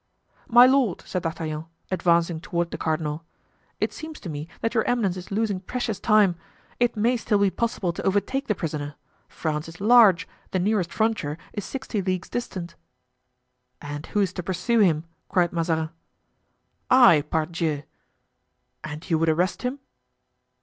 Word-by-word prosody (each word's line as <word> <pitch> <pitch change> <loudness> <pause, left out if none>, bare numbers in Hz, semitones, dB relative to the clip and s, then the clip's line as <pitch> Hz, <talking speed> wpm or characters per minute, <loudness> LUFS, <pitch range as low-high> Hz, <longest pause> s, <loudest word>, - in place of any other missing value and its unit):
"My 240 +1 +8
lord," 255 -7 +2
said 185 - -3
D'Artagnan, 160 -1 -4 0.3
advancing 170 -2 +2
toward 170 -1 -2
the - - -4
cardinal, 155 0 -2 0.6
"it - - 0
seems 315 -1 -8
to 180 - -6
me 150 0 -5
that 225 - 0
your 220 -3 +2
eminence 220 -7 +1
is 185 -1 -8
losing 205 -1 0
precious 220 +1 -3
time. 210 -5 +4 0.4
It 240 -2 +1
may 235 +4 +2
still 215 -2 +1
be 200 -1 +3
possible 210 -7 -1
to - - -5
overtake 260 +8 0
the 210 - +1
prisoner. 150 -4 -4 0.3
France 155 -1 -3
is 165 - -12
large; 205 -5 +6 0.2
the - - -1
nearest 185 -2 +1
frontier 215 -8 0 0.2
is 205 - -4
sixty 250 -6 -3
leagues 185 -1 -2
distant." 185 -8 -4 1.1
"And 145 +1 -7
who 210 - 0
is 185 -2 0
to 180 - -4
pursue 190 +7 0
him?" 165 -7 +3 0.3
cried 175 -2 +2
Mazarin. 160 -2 0 1.0
"I, 245 - +7
pardieu!" 160 -2 -1 1.0
"And 155 +2 -7
you 165 -3 +2
would 165 0 +2
arrest 175 +5 +1
him?" 250 +2 -2
185 Hz, 155 wpm, -25 LUFS, 165-220 Hz, 1.1 s, My